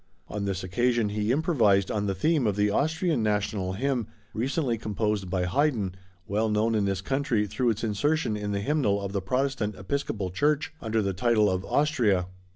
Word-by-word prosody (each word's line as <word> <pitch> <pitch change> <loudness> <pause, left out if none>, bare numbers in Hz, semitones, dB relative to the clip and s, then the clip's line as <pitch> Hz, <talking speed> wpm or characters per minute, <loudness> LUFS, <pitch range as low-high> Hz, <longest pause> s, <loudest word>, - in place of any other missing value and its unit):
On 105 -1 -3
this 95 -1 -2
occasion 120 +3 +1
he 105 +2 -1
improvised 120 - +3
on 105 -1 -1
the 95 - -1
theme 145 - +2
of 100 - +1
the 105 0 +2
Austrian 160 - +1
National 105 -3 0
Hymn, 125 +1 -1 0.3
recently 130 +2 0
composed 105 -3 -2
by 90 0 0
Haydn, 110 -3 +1 0.3
well 110 +2 0
known 110 +2 +1
in 105 -2 +1
this 95 -1 -1
country 125 -2 0
through 115 +5 0
its 110 0 -1
insertion 115 +4 0
in 105 -1 -3
the 100 0 -1
Hymnal 110 -5 +1
of 100 -1 -4
the 100 -1 -1
Protestant 125 0 -1
Episcopal 100 -3 -3
Church, 145 - +1
under 110 -1 0
the 100 -1 -1
title 105 0 +3
of 95 0 -1
Austria. 120 - +2
105 Hz, 180 wpm, -27 LUFS, 100-130 Hz, 0.3 s, improvised